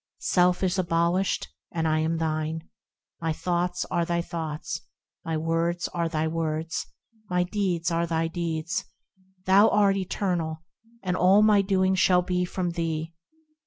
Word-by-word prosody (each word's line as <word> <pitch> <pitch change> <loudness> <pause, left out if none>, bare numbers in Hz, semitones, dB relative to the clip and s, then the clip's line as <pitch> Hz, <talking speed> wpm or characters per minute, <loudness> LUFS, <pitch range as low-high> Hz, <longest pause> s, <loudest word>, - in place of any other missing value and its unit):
Self 180 0 +2
is 185 0 +1
abolished, 170 +2 +1 0.2
and 165 -1 -1
I 155 0 +2
am 160 +1 0
thine; 160 0 -2 0.5
My 165 -1 0
thoughts 175 +2 -1
are 170 - +2
thy 170 0 0
thoughts, 160 -3 -4 0.4
My 165 -1 -2
words 165 +2 0
are 170 -1 -1
thy 160 -1 0
words, 160 0 -2 0.4
My 180 0 +2
deeds 180 -3 -1
are 170 0 +1
thy 165 0 0
deeds; 165 -1 -2 0.6
Thou 195 +3 +6
art 200 -1 +3
eternal, 175 -4 -2 0.4
and 180 -1 0
all 190 +4 +5
my 210 -2 +5
doing 190 -1 +2
shall 185 -1 +4
be 180 0 0
from 180 -1 -2
thee. 165 -1 -3
170 Hz, 145 wpm, -26 LUFS, 165-180 Hz, 0.6 s, Thou